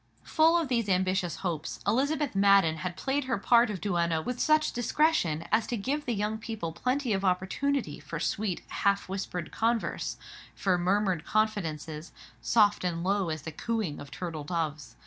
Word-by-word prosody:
Full 325 +1 +4
of 330 -3 0
these 235 -5 0
ambitious 185 -1 +1
hopes, 165 -4 -3
Elizabeth 280 +6 +1
Madden 195 -5 +4
had 175 +3 -4
played 275 +4 -1
her 255 -4 0
part 235 +3 +4
of 200 -3 -4
duenna 170 -4 +1
with 245 +10 -4
such 310 0 +3
discretion 240 - +1
as 220 +1 +2
to 240 - -2
give 280 +8 -2
the 240 - 0
young 210 +2 -1
people 215 -7 -4
plenty 250 - -1
of 195 0 -1
opportunity 190 - 0
for 165 - -6
sweet, 185 +4 -2
half 200 0 +1
whispered 185 -3 -4
converse, 230 0 -1 0.4
for 190 -2 +1
murmured 185 -2 +1
confidences, 165 -8 -2 0.3
soft 210 -4 +3
and 170 -2 -1
low 195 -1 +1
as 155 -2 -4
the 160 - -5
cooing 210 -2 -3
of 145 - -9
turtle 160 0 -5
doves. 150 -6 -3
200 Hz, 165 wpm, -29 LUFS, 170-235 Hz, 0.4 s, Full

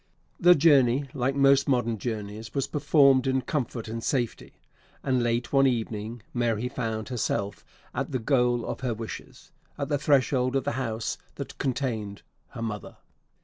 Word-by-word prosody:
The 175 0 +7
journey, 140 -4 +4
like 135 0 0
most 140 0 +4
modern 120 -4 +1
journeys, 110 -1 -5
was 135 - +1
performed 140 -3 +4
in 130 0 +2
comfort 125 -6 -3
and 115 +1 -5
safety; 120 -3 -2 0.5
and, 130 -2 +1
late 120 +1 -1
one 135 0 +5
evening, 115 -2 -3
Mary 120 -1 0
found 110 -3 -3
herself 105 -4 -2 0.3
at - - -3
the 130 - 0
goal 125 -1 +1
of - - -4
her 125 -4 -2
wishes 110 0 -9 0.3
at 140 -1 -3
the 145 -2 +1
threshold 130 -2 +2
of 135 - +1
the - - -1
house 115 -3 -3 0.2
that - - -7
contained 115 -7 -2 0.2
her 115 - -7
mother! 105 -2 -5
125 Hz, 155 wpm, -27 LUFS, 115-135 Hz, 0.5 s, The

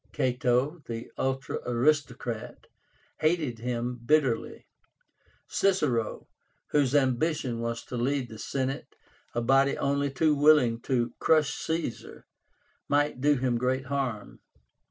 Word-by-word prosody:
Cato, 125 +5 +1
the 115 0 -6
ultra 135 0 -2
aristocrat, 125 -2 -1 0.5
hated 155 -7 0
him 120 +1 -3
bitterly. 135 -2 +1 0.8
Cicero, 150 - 0 0.4
whose 145 -2 +2
ambition 130 -2 +1
was 115 0 -3
to 125 - -6
lead 130 +1 0
the 110 -2 -11
Senate, 135 +4 -3 0.4
a 120 - +1
body 135 +3 +3
only 140 0 0
too 150 +3 +2
willing 145 -6 +4
to 120 -2 +1
crush 155 -2 +3
Caesar, 160 -7 -4 0.6
might 145 -2 +1
do 145 +1 +4
him 125 -2 0
great 130 +1 0
harm. 130 -5 -3
130 Hz, 115 wpm, -28 LUFS, 120-145 Hz, 0.8 s, willing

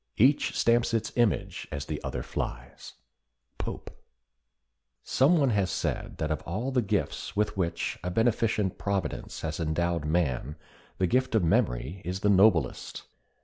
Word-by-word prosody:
Each 135 +6 +4
stamps 115 0 +3
its 115 - -1
image 120 -4 0
as 70 -1 -4
the - - -4
other - - -3
flies." - - -6 0.7
—POPE. - - -5 1.1
Some 150 +7 +3
one 140 -5 +3
has 100 -4 +1
said - - -3
that 80 0 -2
of 75 - -1
all 110 +10 -3
the 130 -2 +2
gifts 105 - -2
with 105 +1 0
which 90 -3 -2
a 90 - -2
beneficent 110 -1 +1
Providence 100 -1 -3
has 80 0 -3
endowed 85 0 0
man 75 -3 0 0.4
the 95 - +2
gift 125 +6 +1
of 110 - +3
memory 65 +2 +1
is 90 +3 -4
the 105 - +3
noblest. 95 -8 +3
95 Hz, 145 wpm, -28 LUFS, 80-115 Hz, 1.1 s, Each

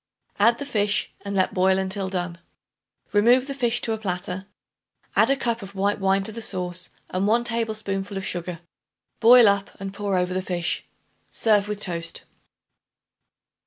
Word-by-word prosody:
Add 230 +3 +5
the 285 - -5
fish 205 -6 0
and 200 0 -4
let 185 -1 +1
boil 190 0 +3
until 190 0 -1
done. 175 -2 -4 0.7
Remove 240 +5 +5
the 275 - -4
fish 240 -3 0
to 225 - 0
a 220 - -4
platter. 185 -1 -4 0.7
Add 220 - +5
a 275 - +4
cup 235 -4 -2
of 195 0 -10
white 200 +2 0
wine 195 0 +2
to 220 - +1
the 230 +2 -7
sauce 180 -3 -2 0.2
and 185 +2 0
1 235 +3 +3
tablespoonful 215 -4 -2
of 195 - -4
sugar. 175 -1 -3 0.6
Boil 240 0 +8
up 200 0 +2
and 195 0 -6
pour 200 -2 -1
over 180 0 0
the 185 - -1
fish. 175 -2 -2 0.4
Serve 210 -3 +2
with 210 0 -4
toast. 170 -3 -3
200 Hz, 165 wpm, -24 LUFS, 185-225 Hz, 0.7 s, Boil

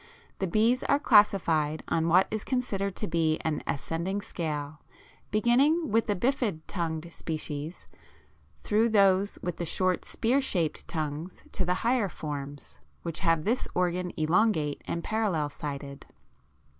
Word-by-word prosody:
The 190 - 0
bees 225 +7 +3
are 280 - +4
classified 175 - +3
on 165 0 +1
what 180 +3 +5
is 215 -1 -2
considered 200 -7 -1
to 210 - -2
be 160 -2 +1
an 155 -2 -1
ascending 170 +7 -2
scale, 150 -4 -4 0.5
beginning 270 +9 +3
with 225 +2 +2
the 205 - +1
bifid 235 - 0
tongued 170 -2 -4
species, 155 0 -5 0.8
through 220 +3 +2
those 200 -2 +3
with 175 -1 -3
the - - -3
short 185 +2 +1
spear 255 +5 +1
shaped 175 - -1
tongues 155 +3 -4
to 185 - -1
the 180 +1 +1
higher 235 -4 +2
forms, 145 -3 -7 0.2
which 165 -2 -3
have 165 -4 +2
this 235 +7 0
organ 180 0 0
elongate 160 -2 +2
and 170 - -3
parallel 195 -10 0
sided. 140 -1 -7
180 Hz, 140 wpm, -28 LUFS, 155-215 Hz, 0.8 s, what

